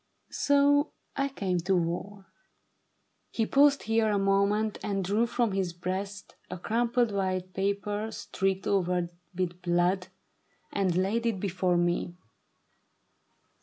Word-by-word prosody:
So 285 +1 +3 0.2
I 275 0 +1
came 190 -9 -1
to - - -6
the - - +4
war." 185 +4 -2 1.0
He 225 - 0
paused 280 +3 +4
here 225 0 +2
a 205 - +2
moment, 200 +2 +1
and 195 -2 -1
drew 210 +5 +2
from 235 -2 0
his 190 -3 -1
breast 190 +3 -5 0.2
A - - -5
crumpled 235 +4 +1
white 185 -2 -2
paper 200 +2 -1
streaked 195 -3 -2
over 180 -3 +1 0.2
with 180 -1 -2
blood, 180 +1 +1 0.7
And 190 -3 +1
laid 215 +5 +1
it 220 -5 -1
before 185 -2 0
me. 175 0 0
195 Hz, 130 wpm, -28 LUFS, 180-220 Hz, 1.0 s, the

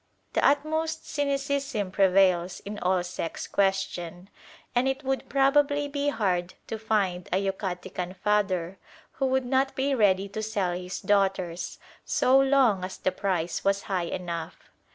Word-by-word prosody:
The - - +1
utmost 315 +3 +1
cynicism 280 -7 -1
prevails 185 -2 +3
in 205 +1 -6
all 180 0 +1
sex 175 -2 -5
questions, 190 -2 -1 0.4
and 245 +2 +2
it 270 +2 -1
would 270 0 -2
probably 285 +1 +3
be 285 0 -2
hard 185 -8 -1
to 220 - -4
find 200 -5 0
a 185 - +3
Yucatecan 190 -2 -3
father 190 -2 0 0.3
who 270 - -1
would 260 0 +1
not 265 +2 +1
be 275 +1 +1
ready 200 -5 +3
to 215 +2 -4
sell 210 -4 -1
his 180 +1 -5
daughters, 190 -4 0 0.3
so 260 +1 +4
long 265 -8 +3
as 185 +1 -5
the 185 - 0
price 180 -3 -2
was 195 0 +1
high 180 -3 -1
enough. 170 -2 -6
200 Hz, 145 wpm, -27 LUFS, 185-270 Hz, 0.4 s, so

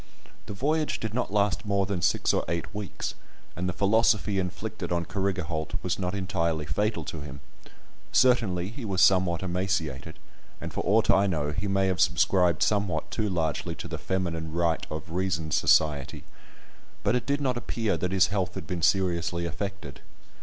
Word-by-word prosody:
The - - -5
voyage 155 +6 0
did 110 -2 -4
not 125 -4 -1
last 100 -6 +1
more 100 -1 +1
than 95 -2 -2
six 85 - +2
or - - +1
eight 85 +4 -3
weeks, 105 -2 -4 0.4
and 90 +2 -2
the - - +1
philosophy 105 0 +2
inflicted 90 -1 -4
on 85 -1 0
Carrigaholt 90 -6 -2
was 90 +1 -1
not 90 +1 -2
entirely 85 -5 -1
fatal 105 +9 -1
to 80 - -6
him; 70 -2 -8 0.7
certainly 105 -8 +3
he 120 +3 -8
was 95 -4 -2
somewhat 95 -3 +4
emaciated, 85 -6 -2 0.4
and - - -6
for - - -1
aught - - +4
I 100 +1 +4
know, 75 -5 -1
he 85 +7 -3
may 95 0 +2
have 95 -1 +1
subscribed 90 -1 +3
somewhat 100 -3 0
too 110 -2 -1
largely 85 -1 -1
to - - -7
the - - -5
"Feminine 85 -4 -2
right 85 0 0
of 75 +1 -6
reason 85 -3 -1
Society"; 75 -3 +2 0.8
but - - +2
it 125 - -2
did 140 0 +1
not 130 -3 0
appear 115 -4 -1
that 90 +2 -2
his 95 -1 +4
health 95 -3 -1
had - - -6
been 90 -3 -4
seriously 85 -1 +1
affected. 95 -3 -5
95 Hz, 175 wpm, -27 LUFS, 85-100 Hz, 0.8 s, somewhat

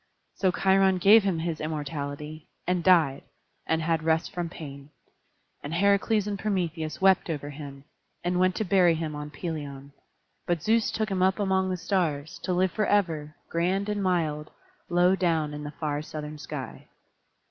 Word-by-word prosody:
So 190 - +1
Cheiron 190 0 +3
gave 210 +5 +7
him 195 -4 0
his 165 -1 -3
immortality, 150 0 -5 0.2
and 180 -1 0
died, 165 -7 +4 0.5
and 160 0 +1
had 165 0 +1
rest 160 +3 0
from 175 -3 -3
pain. 140 -4 -9 0.7
And 150 +3 -4
Heracles 200 +2 +3
and 205 -1 -3
Prometheus 170 -7 -2
wept 190 -2 +4
over 145 -2 -4
him, 140 -1 -9 0.4
and 180 0 0
went 185 0 +3
to 215 - -1
bury 180 -2 +4
him 160 -1 -3
on 150 0 -6
Pelion; 145 -3 -6 0.5
but 170 -3 0
Zeus 225 0 +3
took 220 -1 -2
him 190 -2 -1
up 190 +1 +3
among 190 -2 +1
the 185 - -1
stars, 165 -5 -1
to - - -2
live 180 0 +2
forever, 170 -8 0
grand 185 +4 0
and 205 -1 -1
mild, 160 -5 0 0.4
low 175 +2 +4
down 165 -5 0
in 150 0 -6
the 145 - -5
far 150 -2 -1
southern 150 0 -7
sky. 145 -5 -7
170 Hz, 165 wpm, -27 LUFS, 150-190 Hz, 0.7 s, gave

